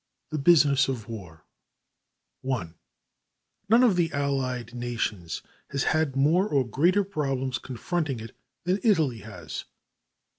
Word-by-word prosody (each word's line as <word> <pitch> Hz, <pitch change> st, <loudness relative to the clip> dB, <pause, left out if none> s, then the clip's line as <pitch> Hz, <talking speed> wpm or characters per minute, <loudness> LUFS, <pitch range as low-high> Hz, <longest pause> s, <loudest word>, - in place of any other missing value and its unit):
The 155 Hz, -, -1 dB
Business 140 Hz, -3 st, +5 dB
of 125 Hz, -6 st, -3 dB
War 95 Hz, -9 st, -9 dB, 1.0 s
ONE 120 Hz, -11 st, -2 dB, 1.0 s
None 230 Hz, +3 st, +6 dB
of 225 Hz, -7 st, +5 dB
the 170 Hz, -2 st, +1 dB
Allied 130 Hz, -4 st, -1 dB
Nations 115 Hz, -8 st, -3 dB, 0.3 s
has 140 Hz, -1 st, -1 dB
had 155 Hz, -4 st, +1 dB
more 160 Hz, +9 st, +3 dB
or 135 Hz, -3 st, +2 dB
greater 175 Hz, -, +3 dB
problems 135 Hz, -8 st, -2 dB
confronting 135 Hz, +1 st, -2 dB
it 115 Hz, +1 st, -9 dB, 0.3 s
than 185 Hz, +3 st, +1 dB
Italy 160 Hz, -, +2 dB
has. -, -, -7 dB
135 Hz, 120 wpm, -27 LUFS, 120-160 Hz, 1.0 s, None